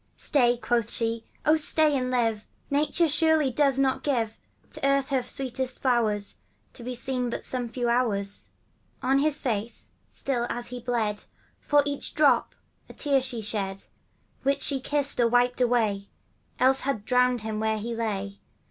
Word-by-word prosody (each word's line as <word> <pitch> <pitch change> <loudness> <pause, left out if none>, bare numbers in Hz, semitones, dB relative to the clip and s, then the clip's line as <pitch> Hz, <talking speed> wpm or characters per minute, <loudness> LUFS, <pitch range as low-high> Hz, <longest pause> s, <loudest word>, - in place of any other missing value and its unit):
* - - -41
Stay,' 245 -4 +4
quoth 235 -2 0
she, 230 -1 -1
' - - -30
Oh, 310 - +5
stay 310 -1 +3
and 255 -1 -1
live! 225 -4 0 0.2
Nature, 305 +4 +2
surely, 315 -2 +3
doth 275 0 +2
not 270 -1 +1
givo 235 -7 0 0.4
To - - -7
the 275 - +2
earth 275 -1 +1
her 265 -2 +1
sweetest 260 0 -2
flowers, 220 -6 0 0.4
To - - -10
be 250 +1 -4
seen 250 0 -2
but - - -5
some 245 -2 -2
few 240 +1 -2
hours.' 210 -5 0 0.5
On 270 +1 +3
his 295 0 +2
face, 230 -4 -4 0.2
still 240 -3 -1
as 240 0 -3
he 250 0 -6
bled, 225 -4 -2 0.3
For 290 0 +3
each 285 -1 -3
drop 280 -6 +3 0.3
a - - -10
tear 280 -2 +1
she 255 -3 -4
shed, 195 -2 -1 0.6
Which 280 +1 0
she 275 -2 +1
kissed 285 +1 +2
or 235 - +4
wiped 245 +1 +2
away, 220 -5 +1 0.5
Else 265 +1 +4
had 255 -7 -2
drowned 250 -1 +2
him 220 -1 -4
where 220 0 0
he 230 +3 -4
lay. 200 -3 -3
245 Hz, 175 wpm, -26 LUFS, 225-275 Hz, 0.6 s, Oh